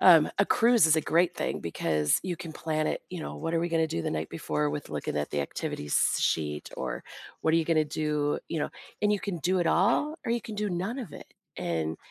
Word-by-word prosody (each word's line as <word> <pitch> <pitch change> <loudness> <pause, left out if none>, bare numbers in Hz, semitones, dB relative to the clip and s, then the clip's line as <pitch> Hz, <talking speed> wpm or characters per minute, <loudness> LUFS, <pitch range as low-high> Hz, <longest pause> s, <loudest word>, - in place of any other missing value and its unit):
Um, 165 -5 +8
a 200 - +5
cruise 235 -6 +5
is 160 - +5
a - - +3
great 170 +3 +2
thing - - -2
because 75 -2 +1
you 180 -2 -3
can 165 -1 -7
plan 155 -1 -1
it, - - -2
you 180 -2 -5
know, - - -5
what 165 0 -2
are 165 - +2
we 170 - 0
gonna 165 -1 +2
do 85 - -3
the - - -1
night 80 0 -2
before 75 -1 -1
with 75 0 -5
looking - - -3
at 75 0 -1
the 75 - 0
activities 70 +1 0
sheet, 75 -2 0
or - - -4 0.4
what 160 - +3
are - - +6
you 165 - +2
gonna 155 -1 +3
do, 150 -1 0
you 165 - -2
know - - -1 0.3
and 210 0 +4
you 205 - 0
can 195 -4 -3
do 185 +5 +1
it 170 - +1
all, 235 - +3
or 230 - +2
you 235 - 0
can 225 -2 -7
do 210 0 0
none 190 +8 -2
of 220 - -6
it, - - -11 0.2
and 80 -1 -2
160 Hz, 250 wpm, -28 LUFS, -, 0.4 s, Um